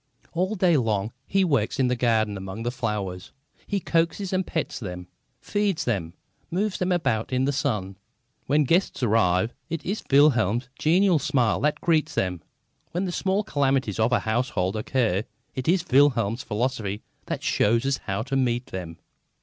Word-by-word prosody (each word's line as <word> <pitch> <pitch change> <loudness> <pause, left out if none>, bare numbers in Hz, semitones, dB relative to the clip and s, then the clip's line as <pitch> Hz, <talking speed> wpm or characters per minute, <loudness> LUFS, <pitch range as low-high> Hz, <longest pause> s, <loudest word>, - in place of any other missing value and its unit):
All 185 +5 0
day 180 -5 +3
long 110 -4 0 0.2
he 195 0 +2
works 140 -3 0
in 130 - +3
the 125 - +1
garden 110 -4 +1
among 95 +4 -6
his 120 - -1
flowers. 100 -6 -3 0.4
He 205 - 0
coaxes 170 +3 0
and 185 0 0
pets 160 - -3
them, 90 -5 -6 0.3
feeds 205 -4 -1
them, 95 -8 -2 0.3
moves 195 +3 -1
them 185 0 0
about 135 -12 0
in 130 +1 +1
the 140 - +1
sun. 105 -9 -2 0.5
When 150 +2 +3
guests 165 -1 +1
arrive, 110 -1 +2 0.2
it 165 -1 -4
is 200 +4 -2
Wilhelm's 125 -5 +4
genial 175 +3 +3
smile 125 -6 +1
that 150 +2 0
greets 155 -2 +1
them. 90 -3 -1 0.5
When 180 +3 -1
the 180 - -2
small 195 +3 0
calamities 135 - 0
of 110 +2 +3
a 120 - +3
household 110 -4 -1
occur, 110 -3 0 0.3
it 130 - -5
is 175 +1 +2
Wilhelm's 125 -4 +3
philosophy 110 -3 -2 0.2
that - - -3
shows 115 +4 +2
us 135 -1 +1
how 100 +2 -3
to 135 +2 -3
meet 125 -2 +1
them. 85 -3 -6
125 Hz, 165 wpm, -25 LUFS, 110-160 Hz, 0.5 s, Wilhelm's